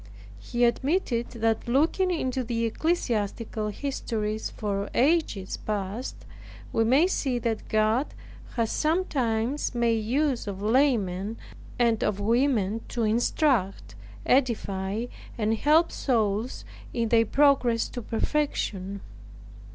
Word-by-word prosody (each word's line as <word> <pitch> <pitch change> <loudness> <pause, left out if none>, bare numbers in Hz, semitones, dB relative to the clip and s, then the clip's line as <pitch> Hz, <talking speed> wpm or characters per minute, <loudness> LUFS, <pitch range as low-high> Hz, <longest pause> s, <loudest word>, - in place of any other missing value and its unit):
He 240 - -2
admitted 250 -1 0
that 225 -1 -1
looking 315 +9 +2
into 260 -7 -1
the 230 -1 -1
ecclesiastical 225 - -1
histories 220 -3 -3
for 200 -1 -3
ages 270 - +1
past, 210 +3 -4 0.6
we 225 - +3
may 265 +9 +4
see 275 -9 0
that 230 -2 -2
God 220 +5 +2 0.5
has 230 -3 0
sometimes 275 -7 0
made 230 -2 +1
use 260 +1 0
of 195 -1 -4
laymen, 215 -4 +1 0.4
and 235 -2 +2
of 205 -1 0
women 225 -1 +1
to 235 - -2
instruct, 225 -1 +1 0.3
edify, 215 -5 +1 0.3
and 220 -1 +1
help 305 +8 +3
souls 225 -1 -1 0.3
in 230 -2 -1
their 230 -1 +4
progress 270 -5 +3
to 245 - -6
perfection. 210 -6 -2
230 Hz, 110 wpm, -26 LUFS, 215-270 Hz, 0.6 s, may